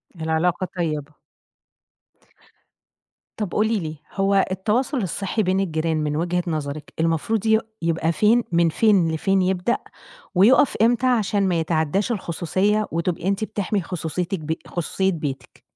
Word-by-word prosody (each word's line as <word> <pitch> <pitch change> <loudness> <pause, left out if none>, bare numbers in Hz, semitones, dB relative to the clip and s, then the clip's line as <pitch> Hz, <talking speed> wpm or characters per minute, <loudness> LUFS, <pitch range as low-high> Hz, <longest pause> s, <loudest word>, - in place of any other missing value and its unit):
العلاقة 165 +3 0
طيبة. 155 -3 -2 2.3
طَب 205 -5 -2
قولي 215 0 +1
لي، 155 -2 -5 0.2
هو 195 0 +2
التواصل 225 +9 0
الصحي 200 +3 -1
بين 190 +1 +1
الجيران 160 -3 0
من 150 -1 -1
وجهة 175 +2 0
نظرِك 150 -2 -4
المفروض 165 +7 0
ي 220 0 +4 0.2
يبقى 165 0 +1
فين، 225 +6 +3
من 170 -1 +3
فين 190 -4 +3
لفين 190 +4 +1
يبدأ، 185 +5 +1 0.6
ويُقف 245 +9 +5
امتى 240 +2 +3
عشان 205 -5 +2
ما 170 -2 +1
يتعداش 160 +7 0
الخصوصية، 195 +2 0
وتبقى 170 +2 -2
أنتِ 200 +2 0
بتحمي 205 -2 -1
خصوصيتِك 175 +1 -3
بي 160 +1 -3
خصوصية 190 +3 -1
بيتِك؟ 135 -6 -6
180 Hz, 130 wpm, -22 LUFS, 160-205 Hz, 2.3 s, ويُقف